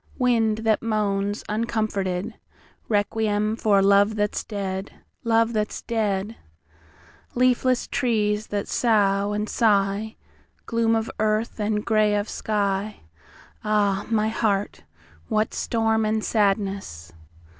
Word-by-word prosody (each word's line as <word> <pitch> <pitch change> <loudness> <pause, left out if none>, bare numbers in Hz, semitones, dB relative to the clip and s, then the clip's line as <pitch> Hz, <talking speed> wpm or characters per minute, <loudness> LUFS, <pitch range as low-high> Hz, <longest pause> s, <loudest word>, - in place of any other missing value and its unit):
Wind 230 -4 +2
that 220 -1 +2
moans, 205 -2 -1
uncomforted, 210 -3 -2 0.6
Requiem 210 0 0
for 205 -3 +3
Love 200 +2 +4
that's 210 -1 -1
dead'Love 210 +3 -2
that's 210 -1 -2
dead! 210 -1 -2 1.0
Leafless 255 0 +2
trees 215 -3 0
that 205 -1 -3
sough 205 -3 +2
and 210 +1 -2
sigh, 210 -1 +1 0.5
Gloom 230 0 +1
of 225 0 -2
earth, 215 +2 0
and 210 0 -1
grey 215 -2 +3
of 205 +1 -1
sky, 205 -1 -2 0.6
Ah, 205 -2 +1
my 215 -1 +1
heart, 205 - -1 0.4
what 215 0 0
storm 225 -1 0
and 215 0 0
sadness! 195 - -1
215 Hz, 105 wpm, -24 LUFS, 200-225 Hz, 1.0 s, Love